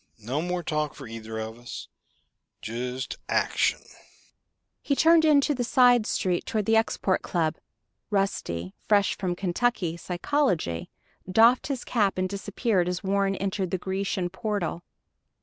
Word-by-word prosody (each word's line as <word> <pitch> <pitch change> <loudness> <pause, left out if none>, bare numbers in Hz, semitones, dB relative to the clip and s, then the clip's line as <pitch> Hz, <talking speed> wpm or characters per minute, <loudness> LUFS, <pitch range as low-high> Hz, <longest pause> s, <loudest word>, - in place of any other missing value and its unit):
No 130 +7 -1
more 180 +1 -2
talk 150 -2 -1
for 135 - -9
either 110 0 -7
of 110 +1 -5
us. 120 - -8 0.7
Just 125 +3 -4
action." - - +1 1.0
He 280 - 0
turned 325 +2 +5
into 295 -1 +4
the 250 -3 -1
side 245 -3 +4
street 180 -2 0
toward 215 -3 -1
the 225 - +3
Export 220 -4 +1
Club. 160 -3 -1 0.5
Rusty 95 - -1
fresh 205 -2 +2
from 180 -3 -2
Kentucky 180 -1 0
psychology 175 - -1 0.4
doffed 230 +5 +5
his 275 -4 -3
cap 205 -6 +1
and 185 0 +1
disappeared 200 -1 -1
as 180 +1 -3
Warren 195 0 +1
entered 195 -1 -2
the 185 - -1
Grecian 190 -1 -2
portal. 190 -3 -2
190 Hz, 135 wpm, -26 LUFS, 160-220 Hz, 1.0 s, turned